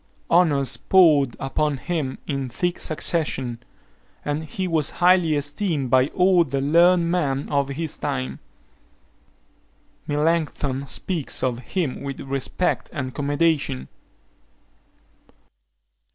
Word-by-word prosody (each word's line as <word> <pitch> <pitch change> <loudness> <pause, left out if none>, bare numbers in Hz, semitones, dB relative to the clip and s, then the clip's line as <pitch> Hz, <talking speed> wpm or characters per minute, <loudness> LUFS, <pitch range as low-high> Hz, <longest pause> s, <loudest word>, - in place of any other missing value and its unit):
Honours 150 -6 +3
poured 150 -9 +4
upon 145 +2 -1
him 150 -3 -3
in 135 -3 -3
thick 175 +8 -2
succession; 150 -7 -1 0.7
and 150 +2 -2
he 185 +5 -4
was 160 -4 +1
highly 175 -3 +4
esteemed 145 - -2
by 130 0 +5
all 180 +1 +3
the 140 -3 -3
learned 170 +4 +4
men 140 -6 0
of 140 -1 0
his 155 +2 -4
time. 65 +1 -3 1.7
Melancthon 145 -3 -1
speaks 165 0 -1
of 125 -2 0
him 150 +1 -3
with 140 -1 -5
respect 135 +6 -2
and 130 -5 -4
commendation. 145 - 0
145 Hz, 105 wpm, -23 LUFS, 135-170 Hz, 1.7 s, by